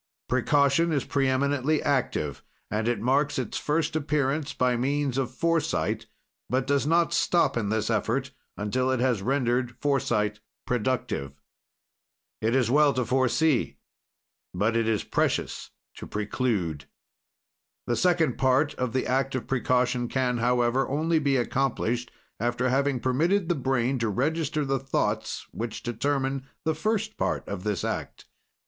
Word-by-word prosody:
"Precaution 140 +5 +3
is 145 -4 0
preeminently 140 +2 +1
active, 125 - -1 0.3
and 110 +1 0
it 120 -3 +1
marks 140 +6 +1
its 130 -5 -3
first 155 +1 0
appearance 145 -1 0
by 125 -1 +1
means 140 +2 0
of 135 -2 0
foresight, 165 +4 0 0.4
but 130 +1 +1
does 140 0 +1
not 170 +1 +3
stop 170 -4 +2
in 110 -4 -1
this 110 0 0
effort 120 +5 0 0.3
until 125 +6 0
it 130 -1 +1
has 125 -5 +1
rendered 120 0 0
foresight 105 -7 0 0.3
productive. 105 - -2 1.0
"It 115 +3 +1
is 125 -3 +2
well 145 0 +5
to 125 -1 0
foresee, 130 +3 +1 0.8
but 105 +5 +1
it 115 -1 +1
is 110 -2 +1
precious - - -1 0.3
to - - -8
preclude. 105 - -2 1.0
"The 120 - 0
second 175 -1 +2
part 135 +3 +3
of 125 -2 -1
the 130 - 0
act 135 +1 0
of 125 -4 -3
precaution 125 -1 +1
can, 125 -1 0
however, 120 +2 +2
only 160 +4 +1
be 140 -2 +1
accomplished 125 -1 -1 0.3
after 120 +2 0
having 135 0 +1
permitted 165 +9 +1
the - - +4
brain 130 -2 0
to 115 -1 0
register 150 +6 0
the 135 0 0
thoughts 135 +1 -2
which 115 0 -5
determine 135 +3 -1 0.2
the 160 - +2
first 215 +6 -1
part - - -1
of 100 -2 -5
this 105 -3 -1
act." - - -4
130 Hz, 140 wpm, -27 LUFS, 120-145 Hz, 1.0 s, well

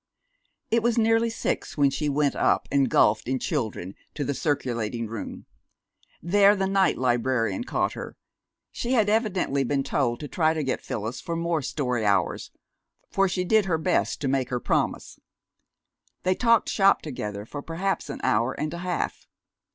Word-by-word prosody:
It 230 +1 +3
was 235 0 +1
nearly 225 0 +3
six 225 - -3
when 140 -2 +4
she 150 +2 -1
went 145 0 +1
up, - - +2
engulfed 120 -6 +3
in 130 +1 0
children, 110 - -3 0.2
to 145 - -2
the 140 - -1
circulating 120 -6 -2
room. 115 0 -7 0.8
There 200 +4 +5
the 190 -1 0
night 195 -1 +2
librarian 125 - 0
caught - - 0
her. - - -8 0.5
She 245 +2 -2
had 220 -5 +3
evidently 195 - +1
been 135 +1 0
told 120 -4 0
to 150 - -5
try 160 +1 +1
to 155 - -1
get 130 - -2
Phyllis 110 +3 -4
for 170 -2 -4
more 170 -1 0
story 125 -4 -2
hours, 100 -2 +1 0.6
for 195 -1 +2
she 180 0 -1
did 215 +2 +3
her 170 -4 +1
best 155 - 0
to 140 - -1
make 130 -1 0
her 125 -1 -1
promise. - - -1 1.0
They 185 - +3
talked 230 +2 +3
shop 195 0 +3
together 105 -8 -5
for 145 +5 -7
perhaps 180 +6 -2
an - - -6
hour 130 0 +2
and 155 +2 -2
a 170 - -5
half. 180 0 -3
150 Hz, 165 wpm, -26 LUFS, 125-190 Hz, 1.0 s, There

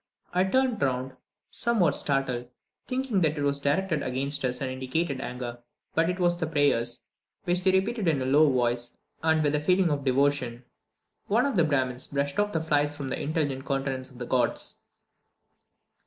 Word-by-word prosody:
I 180 +1 +3
turned 255 +2 +1
round, 130 -1 -1 0.4
somewhat 210 -10 +2
startled, 130 -3 -1 0.4
thinking 255 -6 0
that 155 -2 +1
it 145 - -1
was 140 0 0
directed 155 +3 0
against 140 +3 0
us 125 -1 -1
and 130 -2 -3
indicated 130 +2 -2
anger, 125 -2 -5 0.3
but 165 +1 +2
it 180 - -1
was 175 -1 +2
the 160 - -1
prayers, 140 -6 +2 0.4
which 180 0 0
they 190 - +5
repeated 195 +2 0
in 155 -4 +2
a 130 - -2
low 145 +2 +5
voice 120 -1 -1 0.2
and 160 -1 +2
with 145 -1 +1
a 150 - +1
feeling 180 +2 +3
of 145 -1 -1
devotion. 130 -2 +1 0.6
One 230 +5 +3
of 280 -4 -1
the 170 -4 +4
Brahmins 130 -4 0
brushed 140 +3 -2
off 205 0 +1
the 160 - 0
flies 145 -2 +1
from 140 -3 -4
the - - -3
intelligent 145 -3 -1
countenances 135 -1 -2
of - - -15
the 120 - -5
gods. 125 0 0
145 Hz, 180 wpm, -27 LUFS, 130-175 Hz, 0.6 s, they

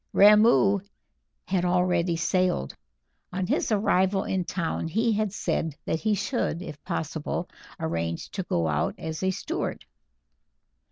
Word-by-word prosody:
Ramoo 210 -1 +6 0.7
had 185 -2 0
already 180 -1 +2
sailed. 175 - 0 0.6
On 185 0 -2
his 185 - 0
arrival 195 -2 +2
in 185 -2 -1
town 170 -2 -2
he 225 +7 +1
had 215 -1 0
said 160 -5 -2
that 160 - -1
he 215 +2 +1
should, 190 -5 -1
if 150 - -9
possible, 160 -1 -3 0.3
arrange 85 0 -3
to 195 - -3
go 85 - 0
out 75 -1 0
as 160 -1 -5
a 190 - +1
steward. 315 - -3
180 Hz, 130 wpm, -26 LUFS, 160-200 Hz, 0.7 s, Ramoo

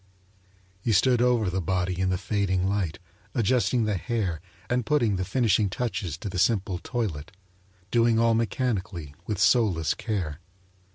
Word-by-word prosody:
He 110 - +1
stood 120 +5 +4
over 120 -4 +3
the 95 +1 -1
body 90 +1 -1
in 95 0 +1
the 90 - +1
fading 95 -2 0
light, 95 -5 -1 0.4
adjusting 120 +1 +2
the 105 -2 0
hair 95 -7 -2 0.3
and 125 0 0
putting 115 -5 +2
the 95 - -1
finishing 110 -2 +2
touches 95 -8 -3
to 110 - -6
the 90 -2 -3
simple 95 -2 +1
toilet, 90 - -3 0.6
doing 115 -1 +3
all 115 0 +4
mechanically, 110 - -2
with 105 - -1
soulless 95 - +3
care. 90 -10 -3
100 Hz, 150 wpm, -26 LUFS, 90-115 Hz, 0.6 s, stood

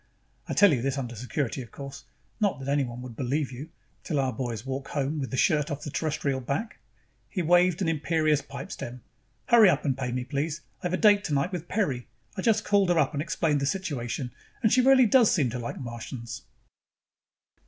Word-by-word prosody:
I - - -1
tell 205 -5 +6
you 125 - 0
this 135 +2 -1
under 125 -3 -4
security, 125 +3 -3
of 120 - -10
course 140 -1 -9 0.3
not 205 -2 +1
that 135 0 -8
anyone 130 -4 -1
would 125 -3 -8
believe 135 +3 -1
you, 135 +6 -8 0.3
till 150 -4 -1
our 130 -2 0
boys 115 -1 -4
walk 135 +1 -4
home 145 +2 -2
with 135 - -3
the 130 - -3
shirt 150 -1 +2
off 145 0 -4
the 145 - -5
Terrestrial 140 -4 -1
back." 140 - -3 0.5
He 185 - -2
waved 175 +2 +4
an - - 0
imperious 155 -1 +1
pipe - - -8
stem. 120 0 -7 0.5
"Hurry 230 -5 +8
up 150 -3 +1
and 135 -3 +1
pay 125 -2 -3
me, 125 0 -2
please. 145 +5 -2 0.2
I've 180 0 -2
a - - +2
date 205 -1 +5
tonight 145 +1 0
with 175 -2 -5
Peri. 145 - -1 0.3
I - - -3
just 220 -2 +2
called 200 -3 +3
her 175 - +3
up 160 - +2
and 145 - -1
explained 155 -2 0
the 140 - 0
situation 135 -8 -3 0.3
and 220 - +4
she 255 - +5
really 260 0 +6
does 235 0 +5
seem 140 -9 +2
to 125 - -4
like 120 - -5
Martians." 115 -1 -7
145 Hz, 205 wpm, -27 LUFS, 130-175 Hz, 0.5 s, Hurry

